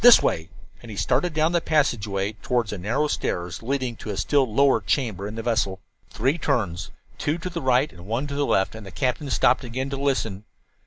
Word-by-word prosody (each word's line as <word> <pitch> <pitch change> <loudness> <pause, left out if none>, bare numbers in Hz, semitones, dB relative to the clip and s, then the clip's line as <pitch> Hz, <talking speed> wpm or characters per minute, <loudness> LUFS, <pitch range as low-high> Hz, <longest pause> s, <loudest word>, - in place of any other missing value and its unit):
This 245 -1 +10
way," 80 0 0 0.3
and 115 - -11
he 105 - -7
started 180 - +1
down 155 +2 +2
the 175 -1 +2
passageway 105 -11 +1
toward 120 -4 0
a - - -4
narrow 120 +11 0
stairs 90 - -2
leading 130 0 -1
to - - -8
a 100 - -3
still 135 +4 +2
lower 140 +4 +4
chamber 105 -8 -1
in 105 - -6
the 115 - -4
vessel. 105 -5 0 0.3
Three 135 +9 0
turns 110 - -1 0.3
two 150 +3 0
to 180 +1 -5
the 170 -1 -3
right 130 +2 +3
and 90 +1 -12
one 115 +6 -1
to 145 - -5
the 145 0 0
left 95 - +2
and 110 -1 -9
the 100 - -9
captain 130 - -1
stopped - - +3
again 130 +3 -3
to 140 - -2
listen. 115 -8 -1
125 Hz, 215 wpm, -24 LUFS, 105-140 Hz, 0.3 s, This